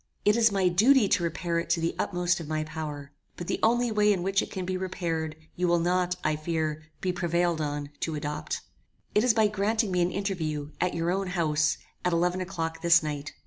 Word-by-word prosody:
It 210 +1 +5
is 230 -2 +4
my 195 -2 +2
duty 220 +6 +5
to 180 - +2
repair 170 0 -1
it 170 - -5
to 170 0 +2
the 165 +1 0
utmost 175 0 0
of 165 - -7
my 155 0 -1
power, 150 -2 -6 0.3
but 175 - -5
the - - -2
only 240 +1 +3
way 210 -1 +4
in 185 -4 0
which 195 +1 +2
it - - -5
can 185 -1 -4
be 185 +1 -2
repaired, 170 -4 -2 0.2
you 180 0 0
will 175 0 +4
not, 180 +1 +1
I 155 0 +1
fear, 155 -1 -2 0.2
be 185 -1 0
prevailed 175 -2 0
on 145 -1 -3
to 160 - -2
adopt. 150 0 -3 0.5
It 210 - +3
is 245 -3 +4
by 220 -1 +4
granting 215 +1 0
me 180 -1 +2
an 175 - +2
interview, 160 -7 -3
at 180 - +1
your 170 +1 0
own 195 +1 -1
house, 160 -4 +1 0.3
at 180 - +1
eleven 180 +2 +1
o'clock 165 -3 -4
this 170 -1 +5
night. 150 -1 -4
175 Hz, 220 wpm, -28 LUFS, 160-190 Hz, 0.5 s, It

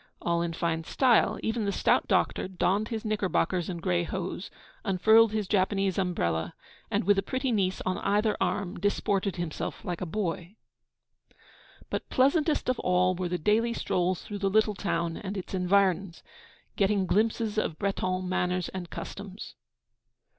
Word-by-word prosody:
all 170 0 0
in 170 0 -1
fine 165 -1 -1
style. 245 +7 +3
Even 220 0 -1
the 200 - 0
stout - - +2
doctor - - +1
donned 190 +3 0
his 225 0 -4
knickerbockers 190 -4 0
and 170 -2 -5
grey 175 -2 +1
hose, 185 +1 -4 0.3
unfurled 220 +4 +5
his 215 -2 -2
Japanese 195 -1 +1
umbrella, 85 - -1 0.3
and, - - 0
with 200 +1 +4
a - - +2
pretty 260 +5 -2
niece 190 -4 0
on 185 - -1
either 210 +2 +1
arm, 185 -1 -1
disported 200 0 0
himself 175 -3 -4
like 175 -2 -3
a - - -1
boy. 180 0 -3 1.4
But - - -3
pleasantest 295 +4 +2
of 255 -1 0
all 180 0 +2
were 180 0 -3
the 180 - -1
daily 220 +7 +2
strolls 180 -5 -1
through 205 -1 -6
the 195 -1 +1
little 215 +1 +3
town 170 -4 -2
and 200 0 -5
its 190 - -6
environs, 190 -1 +1 0.5
getting 200 -1 +2
glimpses 220 +2 +1
of 160 -7 -2
Breton 185 -2 -1
manners 180 -1 0
and 180 -2 -6
customs. 200 +1 -8
190 Hz, 155 wpm, -28 LUFS, 180-210 Hz, 1.4 s, unfurled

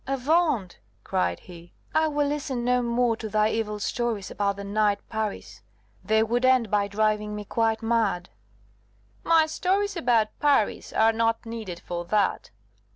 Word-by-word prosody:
"Avaunt!" 275 - +1 0.2
cried 90 -1 -1
he, 175 -1 -14 0.2
"I 315 0 +3
will 295 -1 0
listen 280 -4 -2
no 250 0 +2
more 235 -1 +1
to 220 - -6
thy 215 +1 +2
evil 210 -2 -2
stories 220 -1 -2
about 200 -1 -1
the 200 - -7
knight 205 0 +1
Paris: 220 -2 -4 0.4
they 220 +3 +3
would 240 +3 -1
end 255 -4 +3
by 205 -1 +2
driving 210 0 0
me 210 0 -6
quite 225 +1 0
mad." 220 -6 0 0.9
"My 325 -1 +4
stories 390 +5 -1
about 240 -9 +2
Paris 280 -8 +1
are 225 +1 +3
not 230 +1 0
needed 220 -7 -6
for 175 0 -5
that!" 200 +2 0
225 Hz, 155 wpm, -25 LUFS, 210-250 Hz, 0.9 s, My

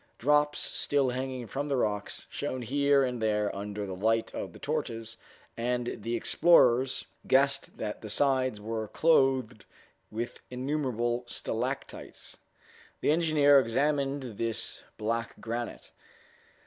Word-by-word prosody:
Drops, 150 +3 +3
still 140 -2 +2
hanging 130 -1 -4
from 140 +6 -3
the 140 - 0
rocks, 105 -4 -2
shone 130 -1 -3
here 140 +2 +3
and 125 -2 -2
there 105 -2 +1
under 105 +1 -4
the 95 - -5
light 115 +4 +1
of - - -5
the - - -13
torches, 115 0 -3 0.4
and 120 +1 -1
the 115 +3 -2
explorers 130 -2 +4 0.2
guessed 140 +1 +2
that 105 -1 -4
the 110 - -7
sides 130 -2 +1
were 110 +1 -3
clothed 130 -6 +2 0.5
with 115 +3 -5
innumerable 125 -3 -1
stalactites. - - -5 0.6
The - - +3
engineer 150 -3 +5
examined 135 -1 0
this 115 -1 -3 0.2
black 115 +2 -2
granite. 120 +1 -5
125 Hz, 120 wpm, -29 LUFS, 115-140 Hz, 0.6 s, engineer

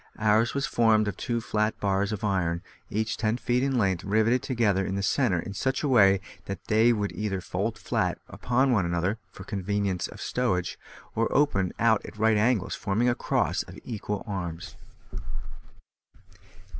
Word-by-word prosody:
Ours 110 +3 +2
was 140 - 0
formed 110 -2 +3
of 100 - -2
two 120 -1 -2
flat 110 -1 -1
bars 100 0 0
of 105 -1 -4
iron, 90 -4 0 0.3
each 110 +2 -1
ten 110 +1 0
feet 125 0 0
in 135 -1 +1
length, 95 -5 +1
riveted 110 +5 +2
together 110 -7 +1
in 95 - -2
the 100 - -2
centre 110 -3 +2
in 100 - -5
such 130 +8 -1
a - - +1
way 100 -7 +5 0.3
that 100 - -6
they 110 +2 +5
would 105 -3 -1
either 105 -3 -2
fold - - -3
flat - - -1
one - - -11
upon 130 +2 +2 0.2
the 85 - 0
other 95 +6 0
(for 95 - -10
convenience 100 -2 -1
of - - -12
stowage), 90 -8 -1 0.3
or 115 +1 0
open 100 -11 +2
out 110 -2 +3
at - - -10
right 110 +1 +3
angles, 110 -2 +1
forming 110 +5 +1
a - - +3
cross - - 0
of - - -10
four - - -12
equal 105 -3 -4
arms. 85 -5 -5
105 Hz, 180 wpm, -27 LUFS, 95-115 Hz, 0.3 s, way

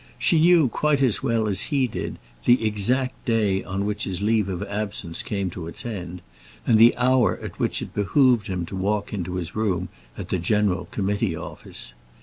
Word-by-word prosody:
She 165 - +3
knew 165 -2 +5
quite 150 +4 +1
as 120 -4 +3
well 115 -4 +1
as 100 +2 -1
he 140 -3 +2
did 120 - -5 0.3
the 120 -2 +4
exact 125 +5 0
day 105 -5 +1
on 95 +1 -3
which 105 0 -2
his 95 +1 -4
leave 105 -2 +2
of 90 -2 -3
absence 100 -5 -3
came 100 -3 -3
to 85 -1 -7
its 85 - -8
end, 90 -6 -6 0.4
and 110 -2 +4
the 115 +2 +7
hour 125 0 +3
at - - -9
which - - 0
it - - -9
behoved 120 +2 +3
him 90 -3 -3
to 95 - -7
walk 100 +3 -1
into 90 -3 -3
his 90 -3 -5
room 95 -5 -1 0.3
at - - -7
the 95 - 0
General 100 +1 +1
Committee 100 -2 -1
Office. - - -8
105 Hz, 190 wpm, -24 LUFS, 95-120 Hz, 0.4 s, the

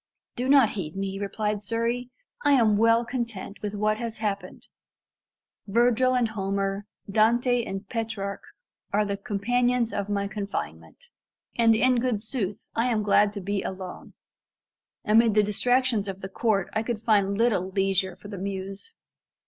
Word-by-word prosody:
"Do 250 +2 -2
not 270 -6 +6
heed 170 -6 -5
me," 195 0 -3
replied 210 +1 -2
Surrey; 230 +3 -2 0.3
"I 290 - +4
am 225 -6 +4
well 230 +2 +4
content 235 -5 -5
with 210 0 -4
what 215 +1 0
has 230 -2 -4
happened. 205 -2 -4 1.0
Virgil 240 +4 +3
and 240 -3 +2
Homer, 195 -1 -2 0.2
Dante 235 +4 +3
and 195 -1 -6
Petrarch, 215 -3 -4 0.5
are 210 +1 +2
the 200 -1 -2
companions 235 +4 0
of 200 0 -3
my 200 -1 0
confinement; 205 - -6 0.5
and 230 -1 +5
in 250 +3 +3
good 240 -3 0
sooth, 215 -4 -4
I 230 +2 +2
am 220 -4 +1
glad 205 0 +4
to 200 - -5
be 200 +1 -2
alone. 185 -1 -7 0.9
Amid 220 0 +4
the 210 - +5
distractions 240 +1 +2
of 195 0 -6
the 190 - -6
court 205 -3 0
I 220 - +1
could 225 -1 -3
find 200 -3 +2
little 205 -5 +2
leisure 195 -1 0
for - - -12
the 200 -2 -7
muse." 195 - -6
210 Hz, 155 wpm, -26 LUFS, 200-235 Hz, 1.0 s, not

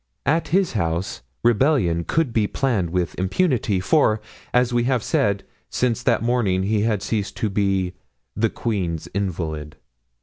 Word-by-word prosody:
At 160 +4 +2
his 190 0 +2
house 85 - -2 0.2
rebellion 115 - +3
could 155 -7 0
be 110 -2 +2
planned 115 -11 0
with 90 -2 -1
impunity, 105 - +1
for, 110 - +3 0.3
as 125 0 +2
we 120 0 +2
have 125 -3 +1
said, 100 -1 +1 0.3
since 125 -1 0
that 125 - +2
morning 115 -6 +1
he 105 +1 +1
had 105 -2 0
ceased 105 -2 -2
to 105 - -1
be 95 -2 +1 0.4
"the 115 +1 +2
queen's 90 -10 -2
invalid." 80 -6 -3
105 Hz, 145 wpm, -22 LUFS, 95-120 Hz, 0.4 s, rebellion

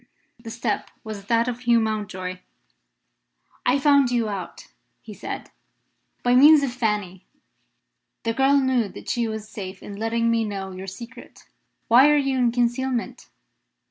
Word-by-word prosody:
The 230 -1 -9
step 225 -2 -3
was 210 -3 -7
that 230 +2 +2
of 245 -1 -3
Hugh 240 -1 +3
Mountjoy. 195 -4 -3 1.3
"I 250 +3 +4
found 280 -2 +4
you 235 -3 0
out," 195 -3 -6 0.3
he - - -11
said, - - -7 0.7
"by 245 - +3
means 290 +3 +7
of 260 -3 -2
Fanny. 210 -6 -2 1.0
The 230 - 0
girl 270 +3 +3
knew 260 -5 +1
that - - -10
she 235 -2 0
was 220 -1 -5
safe 190 -3 -8
in 200 - -8
letting 230 +1 0
me 230 0 +1
know 195 -3 -5
your 185 +1 -8
secret. 230 +5 -11 0.4
Why 255 +5 +7
are 295 - +4
you 270 -2 0
in 240 -2 +3
concealment?" 245 +1 -2
230 Hz, 150 wpm, -23 LUFS, 210-250 Hz, 1.3 s, means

